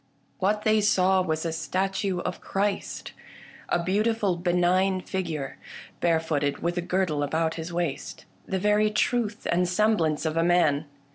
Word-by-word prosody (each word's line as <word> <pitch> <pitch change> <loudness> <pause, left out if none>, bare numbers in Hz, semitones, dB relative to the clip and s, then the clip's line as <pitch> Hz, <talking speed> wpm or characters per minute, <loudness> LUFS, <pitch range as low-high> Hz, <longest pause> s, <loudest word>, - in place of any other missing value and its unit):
What 210 +3 +1
they 215 0 +3
saw 190 -2 +3
was 160 -2 -2
a 165 - -1
statue 190 +3 -1
of 180 - -4
Christ, 200 +1 -2 0.6
a 175 - +1
beautiful 205 +1 +1
be 175 +1 -1
nign 185 +2 +2
figure; 160 -8 -4 0.4
barefooted, 160 -4 +1
with 170 +1 0
a - - -1
girdle 175 -4 0
about 160 +3 0
his 165 +1 -6
waist: 170 -4 -3 0.2
the 190 - -1
very 210 +2 +3
truth 220 0 0
and 180 +1 +2
semblance 180 -7 +1
of 160 0 -1
a 165 - +3
man. 165 -4 +3
180 Hz, 150 wpm, -26 LUFS, 160-195 Hz, 0.6 s, they